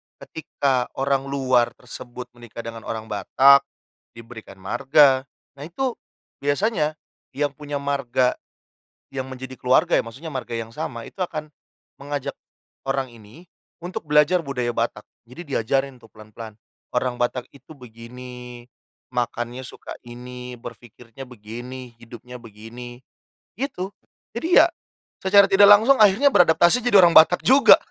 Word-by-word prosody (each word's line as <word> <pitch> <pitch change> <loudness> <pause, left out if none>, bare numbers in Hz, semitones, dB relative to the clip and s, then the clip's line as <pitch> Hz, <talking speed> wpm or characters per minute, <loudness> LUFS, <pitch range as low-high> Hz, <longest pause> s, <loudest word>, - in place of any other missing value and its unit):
ketika 135 -5 -2
orang 135 0 -1
luar 130 -3 +1
tersebut 125 0 -10
menikah 120 -1 -11
dengan 115 -1 -9
orang 110 -1 -4
Batak 135 +7 +4 0.5
diberikan 115 -3 -12
marga, 130 +7 +3 0.3
nah - - -7
itu 255 +10 -2 0.5
biasanya 155 +2 0 0.4
yang 145 0 0
punya 145 0 -7
marga, 135 -3 0 0.7
yang 130 -1 -4
menjadi 130 0 -8
keluarga 125 +1 +3
ya, - - +4
maksudnya 140 +7 -9
marga 125 -3 -4
yang 115 0 -7
sama 115 0 -6
itu 195 - -10
akan 155 -4 -4 0.5
mengajak 145 -1 -4 0.5
orang 135 -2 -2
ini 115 +10 -16 0.3
untuk 170 -3 -7
belajar 150 +4 +4
budaya 125 -5 -3
Batak. 115 -2 -3 0.2
Jadi 145 +2 -10
diajarin 135 +2 -1
tuh 115 - -18
pelan-pelan. 110 0 -12 0.3
Orang 125 0 -2
Batak 120 0 -1
itu 140 +2 -16
begini, 125 0 -11 0.5
makannya 120 +1 -3
suka 125 - -9
ini, 125 +1 -10
berfikirnya 120 +2 -12
begini, 120 +2 -9
hidupnya 120 +1 -11
begini, 120 +3 -11 0.5
gitu. 205 -9 -4 0.4
Jadi 330 +10 +4
ya, - - +4 0.5
secara 200 +1 +5
tidak 200 +1 +7
langsung 220 +6 +6
akhirnya 215 +7 +5
beradaptasi 175 +2 +4
jadi 200 -6 +7
orang 170 - +6
Batak 165 +2 +6
juga. 270 +2 +7
130 Hz, 130 wpm, -22 LUFS, 120-150 Hz, 0.7 s, tidak